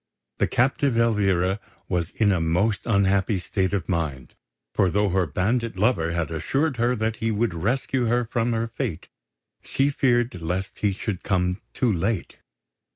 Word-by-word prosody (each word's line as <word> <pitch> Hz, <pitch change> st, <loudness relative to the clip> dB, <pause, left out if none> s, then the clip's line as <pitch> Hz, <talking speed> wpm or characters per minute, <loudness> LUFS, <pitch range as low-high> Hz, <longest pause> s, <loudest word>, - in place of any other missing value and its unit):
The -, -, +3 dB
captive 135 Hz, 0 st, +1 dB
Elvira 100 Hz, -4 st, +2 dB, 0.3 s
was 85 Hz, -3 st, -1 dB
in 105 Hz, -2 st, +2 dB
a 90 Hz, -3 st, +1 dB
most 90 Hz, +8 st, 0 dB
unhappy 100 Hz, -1 st, +2 dB
state 95 Hz, +1 st, -1 dB
of 100 Hz, -5 st, -2 dB
mind; 75 Hz, -8 st, -2 dB, 0.4 s
for 95 Hz, -, +3 dB
though 105 Hz, +3 st, +1 dB
her 95 Hz, -1 st, +1 dB
bandit 110 Hz, -, -1 dB
lover 95 Hz, -5 st, +2 dB
had 85 Hz, -1 st, -2 dB
assured 135 Hz, -, 0 dB
her 120 Hz, +2 st, +2 dB
that 110 Hz, 0 st, -1 dB
he 115 Hz, -, -1 dB
would 110 Hz, -2 st, 0 dB
rescue 120 Hz, +7 st, 0 dB
her 120 Hz, +1 st, +2 dB
from 115 Hz, +1 st, 0 dB
her 115 Hz, 0 st, 0 dB
fate, 115 Hz, -, -4 dB, 0.5 s
she 140 Hz, +2 st, +1 dB
feared 120 Hz, -7 st, +1 dB
lest 90 Hz, +3 st, -3 dB
he 105 Hz, -, +2 dB
should 95 Hz, -1 st, -4 dB
come 90 Hz, +1 st, 0 dB
too 120 Hz, -4 st, +2 dB
late. 95 Hz, +3 st, -2 dB
105 Hz, 160 wpm, -24 LUFS, 90-115 Hz, 0.5 s, The